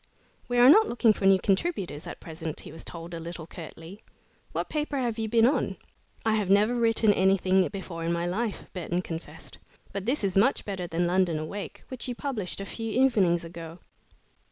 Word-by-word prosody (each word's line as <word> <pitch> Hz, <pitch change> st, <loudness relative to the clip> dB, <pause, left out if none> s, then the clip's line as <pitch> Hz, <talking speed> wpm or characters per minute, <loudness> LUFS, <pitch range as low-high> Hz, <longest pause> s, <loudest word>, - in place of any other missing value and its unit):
"We 245 Hz, -, -1 dB
are 245 Hz, +1 st, +8 dB
not 430 Hz, +10 st, +8 dB
looking 235 Hz, -2 st, +4 dB
for 200 Hz, -, -3 dB
new 195 Hz, 0 st, +7 dB
contributors 190 Hz, -, -1 dB
at -, -, -7 dB
present," 160 Hz, -1 st, -6 dB
he -, -, -10 dB
was 160 Hz, +1 st, -8 dB
told 170 Hz, 0 st, -6 dB
a 165 Hz, -, -4 dB
little 165 Hz, 0 st, -7 dB
curtly. 165 Hz, +4 st, -10 dB, 0.5 s
"What -, -, -2 dB
paper 300 Hz, -2 st, -2 dB
have 235 Hz, -4 st, -1 dB
you 220 Hz, -1 st, -1 dB
been 230 Hz, 0 st, +5 dB
on?" 265 Hz, -, +1 dB, 0.5 s
"I 220 Hz, -, +3 dB
have 210 Hz, -3 st, 0 dB
never 205 Hz, +4 st, +4 dB
written 225 Hz, -2 st, +4 dB
anything 190 Hz, -1 st, +3 dB
before 185 Hz, -4 st, -6 dB
in 165 Hz, -, 0 dB
my 170 Hz, 0 st, 0 dB
life," 205 Hz, +5 st, -2 dB
Burton 180 Hz, 0 st, -2 dB
confessed, 165 Hz, -1 st, -7 dB, 0.3 s
"but 200 Hz, +1 st, -4 dB
this 260 Hz, -1 st, +1 dB
is 195 Hz, -2 st, 0 dB
much 225 Hz, +8 st, +3 dB
better 190 Hz, -3 st, -4 dB
than 175 Hz, +1 st, 0 dB
'London 175 Hz, -2 st, +2 dB
Awake,' 155 Hz, +7 st, -6 dB
which 260 Hz, -1 st, -5 dB
you 245 Hz, -, -3 dB
published 235 Hz, -11 st, -4 dB
a 195 Hz, -, -4 dB
few 225 Hz, +3 st, -5 dB
evenings 205 Hz, -9 st, +3 dB
ago." 165 Hz, 0 st, -8 dB
195 Hz, 195 wpm, -27 LUFS, 170-230 Hz, 0.5 s, are